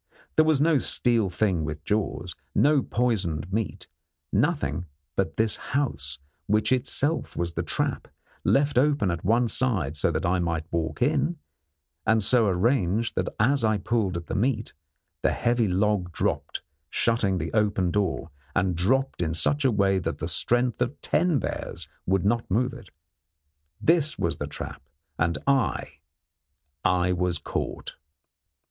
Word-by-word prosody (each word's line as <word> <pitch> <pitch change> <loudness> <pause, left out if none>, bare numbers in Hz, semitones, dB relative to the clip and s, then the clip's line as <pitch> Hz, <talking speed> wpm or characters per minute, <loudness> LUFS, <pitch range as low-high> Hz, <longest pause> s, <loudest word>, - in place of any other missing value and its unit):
There 155 - +5
was 155 -3 +3
no 155 -1 +4
steel 115 -5 +2
thing 90 -2 0
with 75 0 -5
jaws; 100 -3 -2 0.2
no 145 0 +4
poisoned 95 - -1
meat; 110 0 -2 0.5
nothing 125 - 0 0.3
but 80 - -1
this 110 -1 +2
house, 75 - -2 0.3
which 105 +3 +2
itself 140 +4 +1
was 85 -1 -1
the - - -1
trap, - - -2 0.4
left 140 -2 +3
open 140 -8 +2
at 85 -2 -4
one 115 +5 +3
side 100 - 0
so 75 - +1
that - - -1
I 90 +1 +2
might 85 -2 -1
walk 80 -2 -1
in, 170 0 +1 0.7
and 110 -1 +3
so 115 +1 +4
arranged 105 +2 +1
that - - -1
as 130 +4 +3
I 110 -1 +3
pulled 105 -3 0
at 85 - -6
the - - -6
meat 115 0 0 0.5
the - - +2
heavy 120 -1 +1
log 95 -1 +1
dropped, - - -2 0.3
shutting 110 -5 +1
the - - -4
open 100 -4 +2
door, 100 0 -1 0.2
and 90 -2 +1
dropped 130 +8 +1
in 80 -1 0
such 145 - +2
a 130 - +4
way 100 -2 +2
that 85 -2 -3
the 80 - -4
strength 120 +10 +1
of 125 +4 -1
ten 170 -2 +2
bears 85 - -4 0.2
would 95 0 +1
not 115 +3 +1
move 125 +6 +1
it. 120 -5 -11 0.9
This 155 -2 +2
was 85 -3 -1
the 75 - -4
trap, 75 - -7 0.4
and 85 +1 +1
I 130 - 0 0.8
I 90 0 +2
was 90 -1 0
caught! - - -5
105 Hz, 155 wpm, -26 LUFS, 90-125 Hz, 0.9 s, There